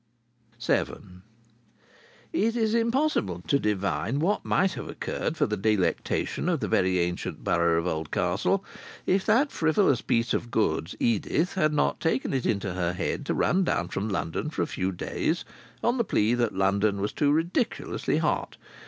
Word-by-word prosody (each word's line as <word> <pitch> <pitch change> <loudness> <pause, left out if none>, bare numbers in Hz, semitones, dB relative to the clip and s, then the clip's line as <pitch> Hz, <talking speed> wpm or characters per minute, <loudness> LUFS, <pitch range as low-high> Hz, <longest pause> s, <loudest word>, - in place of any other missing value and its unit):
VII 90 -6 -2 1.1
It 225 +3 +1
is 220 -2 +1
impossible 230 - +1
to 140 - +2
divine 105 +4 -1
what 190 +7 +1
might 190 0 +2
have - - -6
occurred - - -3
for - - +3
the 105 - -1
delectation 105 -2 0
of - - +1
the - - -2
very 95 0 +2
ancient 90 0 -2
borough 85 -1 +2
of 85 - 0
Oldcastle 90 - 0 0.4
if 190 +1 +1
that 260 +7 +4
frivolous 160 - +2
piece 115 +1 +1
of 120 - -2
goods, 90 -6 0
Edith, 120 - +1
had 155 -5 +2
not 150 - +1
taken 140 -6 0
it 130 -2 0
into 100 -3 -1
her 90 -1 -1
head 90 - -3
to - - 0
run 190 +4 +2
down 85 - 0
from 100 +4 -2
London 85 -4 -2
for - - -1
a - - 0
few 95 +1 -2
days, 90 - -2 0.4
on 240 +2 +2
the - - +4
plea 110 - +2
that 120 -4 0
London 100 +1 +2
was 100 +1 -2
too 145 -1 +2
ridiculously 170 - 0
hot. - - -1
115 Hz, 165 wpm, -27 LUFS, -, 1.1 s, that